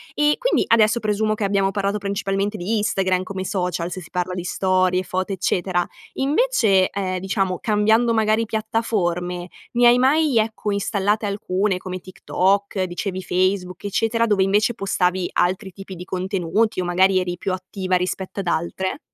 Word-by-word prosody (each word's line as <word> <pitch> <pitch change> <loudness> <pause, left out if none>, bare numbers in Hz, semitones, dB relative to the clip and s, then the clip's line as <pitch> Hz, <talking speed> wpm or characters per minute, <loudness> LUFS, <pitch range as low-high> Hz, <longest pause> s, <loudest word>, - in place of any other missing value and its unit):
E 295 0 +3
quindi - - +2
adesso 225 0 +4
presumo 215 0 0
che 210 - -4
abbiamo 195 -1 +1
parlato 200 +1 -1
principalmente 200 +1 -2
di 200 +5 -1
Instagram, 190 -3 +1
come 190 0 -5
social, 180 -3 -2
se 185 - -5
si 165 - -13
parla 180 0 -2
di 180 - -4
storie, 185 0 +1
foto, 185 +2 -2
eccetera. 180 -1 0 0.3
Invece, 270 - +2
ehm, 185 -2 -2
diciamo 190 -1 -1
cambiando 220 +2 +3
magari 220 0 +2
piattaforme, 180 -6 -2 0.2
ne 240 0 +5
hai 240 +1 +6
mai, 280 -1 +3
ecco, 215 -1 0
installate 205 +1 0
alcune 200 -1 -1
come 185 0 -6
TikTok, 190 +2 0
dicevi 185 +1 -3
Facebook, 185 0 -1
eccetera, 225 +3 +1
dove 205 -4 +2
invece 210 +5 +2
postavi 185 -4 0
altri 190 +2 0
tipi 195 0 -9
di 180 - -8
contenuti 190 +3 -1
o 180 - -3
magari 185 +2 +3
eri 175 -1 -3
più 190 - -3
attiva 185 0 -2
rispetto 185 +2 -3
ad 190 - -4
altre? 180 - -2
195 Hz, 160 wpm, -22 LUFS, 185-215 Hz, 0.3 s, hai